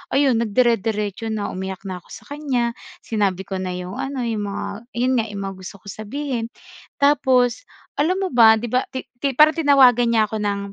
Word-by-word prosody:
Ayun, 270 Hz, -5 st, +3 dB
nagdire-diretso 225 Hz, -2 st, +1 dB, 0.2 s
na, 210 Hz, -2 st, -3 dB
umiyak 190 Hz, 0 st, -5 dB
na 185 Hz, -2 st, -5 dB
ako -, -, -26 dB
sa -, -, -11 dB
kanya. 260 Hz, -5 st, -1 dB, 0.3 s
Sinabi 200 Hz, -4 st, 0 dB
ko 190 Hz, -1 st, -5 dB
na 185 Hz, -1 st, -3 dB
yung 180 Hz, +2 st, -6 dB
ano, 270 Hz, -2 st, -3 dB
yung 220 Hz, -3 st, -2 dB
mga 200 Hz, -, -4 dB, 0.3 s
'yon 250 Hz, +2 st, +1 dB
nga, 225 Hz, -, 0 dB
yung 205 Hz, -2 st, -6 dB
mga 195 Hz, 0 st, -5 dB
gusto 185 Hz, +2 st, -9 dB
kong 200 Hz, -, -7 dB
sabihin. 245 Hz, +1 st, -3 dB, 0.5 s
Tapos, 265 Hz, -, +2 dB, 0.3 s
alam 330 Hz, +6 st, +2 dB
mo 370 Hz, -, -2 dB
ba, 225 Hz, -2 st, +7 dB
'di 225 Hz, +1 st, -5 dB
ba, 255 Hz, +1 st, +1 dB
ti 260 Hz, -1 st, -6 dB, 0.2 s
ti 275 Hz, -1 st, -1 dB
parang 310 Hz, +4 st, +5 dB
tinawagan 260 Hz, -5 st, +5 dB
niya 220 Hz, -, +5 dB
ako 220 Hz, -, -2 dB
ng, 205 Hz, -1 st, -1 dB
230 Hz, 195 wpm, -21 LUFS, 205-265 Hz, 0.5 s, ba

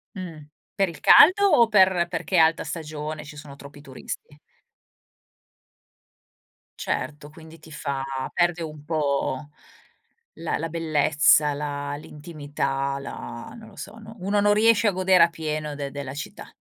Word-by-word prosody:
Mhmm, 165 Hz, -6 st, -8 dB, 0.3 s
per 195 Hz, -3 st, +1 dB
il 165 Hz, -, -11 dB
caldo 375 Hz, +5 st, +7 dB
o 235 Hz, -9 st, +5 dB
per 190 Hz, -5 st, +4 dB
perché 190 Hz, -, -3 dB
è -, -, +6 dB
alta 160 Hz, +1 st, +4 dB
stagione, 155 Hz, -1 st, -6 dB
ci 150 Hz, 0 st, -11 dB
sono 145 Hz, -1 st, -11 dB
troppi 145 Hz, +1 st, -13 dB
turisti? 145 Hz, +2 st, -9 dB, 2.4 s
Certo, 150 Hz, 0 st, -4 dB
quindi 160 Hz, +1 st, -14 dB
ti 160 Hz, 0 st, -16 dB
fa 140 Hz, -3 st, -4 dB, 0.3 s
perde 175 Hz, -1 st, +1 dB
un 150 Hz, -2 st, -8 dB
po' 145 Hz, -2 st, -1 dB, 0.8 s
la 165 Hz, -, -3 dB
la 165 Hz, +1 st, -3 dB
bellezza, 155 Hz, -2 st, +3 dB
la 145 Hz, 0 st, -4 dB
l'intimità, 145 Hz, -3 st, -4 dB
la 120 Hz, -3 st, -8 dB
non 220 Hz, -1 st, -13 dB
lo 205 Hz, -, -18 dB
so, 205 Hz, +3 st, -9 dB, 0.2 s
uno 200 Hz, +3 st, 0 dB
non 205 Hz, 0 st, +4 dB
riesce 220 Hz, 0 st, +4 dB
a 205 Hz, -, +4 dB
godere 185 Hz, -1 st, +4 dB
a 170 Hz, -, +4 dB
pieno 155 Hz, -2 st, -4 dB
de 140 Hz, -1 st, -5 dB
della 140 Hz, -1 st, -6 dB
città. 145 Hz, -, -8 dB
155 Hz, 145 wpm, -24 LUFS, 145-175 Hz, 2.4 s, caldo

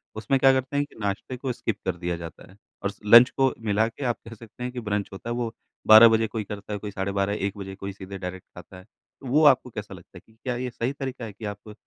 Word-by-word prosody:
उसमें 110 Hz, +5 st, 0 dB
क्या 135 Hz, 0 st, +6 dB
करते 130 Hz, +2 st, -1 dB
हैं 145 Hz, -, +1 dB
कि -, -, -22 dB
नाश्ते 105 Hz, +5 st, -3 dB
को 130 Hz, 0 st, -3 dB
स्किप 115 Hz, -3 st, -3 dB
कर 95 Hz, -2 st, -1 dB
दिया 85 Hz, 0 st, -2 dB
जाता 85 Hz, -2 st, -10 dB
है। 95 Hz, -, -18 dB, 0.3 s
और 100 Hz, -, +1 dB
स -, -, -22 dB
लंच 120 Hz, +4 st, +9 dB
को 135 Hz, -1 st, +1 dB
मिला 110 Hz, +1 st, +2 dB
के 115 Hz, +4 st, -8 dB
आप 120 Hz, -, 0 dB
कह 115 Hz, -, -8 dB
सकते 115 Hz, +2 st, -11 dB
हैं 125 Hz, -, -3 dB
कि 125 Hz, -, -4 dB
ब्रंच 105 Hz, -3 st, -2 dB
होता 105 Hz, +4 st, -7 dB
है -, -, -1 dB
वो 120 Hz, -2 st, -2 dB, 0.4 s
12 110 Hz, +2 st, +10 dB
बजे 110 Hz, 0 st, +2 dB
कोई 110 Hz, -1 st, -4 dB
करता 105 Hz, +1 st, -7 dB
है, 105 Hz, -, -3 dB
कोई 105 Hz, 0 st, -6 dB
साढ़े 95 Hz, 0 st, -3 dB
12 100 Hz, +1 st, 0 dB
बजे, 100 Hz, -, -2 dB
1 100 Hz, +1 st, -4 dB
बजे 95 Hz, -1 st, -7 dB
कोई 100 Hz, 0 st, -6 dB
सीधे 95 Hz, 0 st, -8 dB
डायरेक्ट 90 Hz, 0 st, -7 dB
खाता 95 Hz, -, -12 dB
है। 95 Hz, -, -13 dB
तो 130 Hz, +4 st, -17 dB
वो 150 Hz, +5 st, +3 dB
आपको 130 Hz, -3 st, +5 dB
कैसा 105 Hz, -3 st, -7 dB
लगता 90 Hz, +1 st, -14 dB
है -, -, -12 dB
कि 110 Hz, -, -24 dB
क्या 125 Hz, -2 st, -2 dB
ये 125 Hz, +1 st, -3 dB
सही 120 Hz, +3 st, -3 dB
तरीक़ा 130 Hz, -4 st, -5 dB
है 105 Hz, -, -8 dB
कि 110 Hz, -, -9 dB
आप 105 Hz, +1 st, -13 dB
110 Hz, 290 wpm, -25 LUFS, 100-125 Hz, 0.4 s, 12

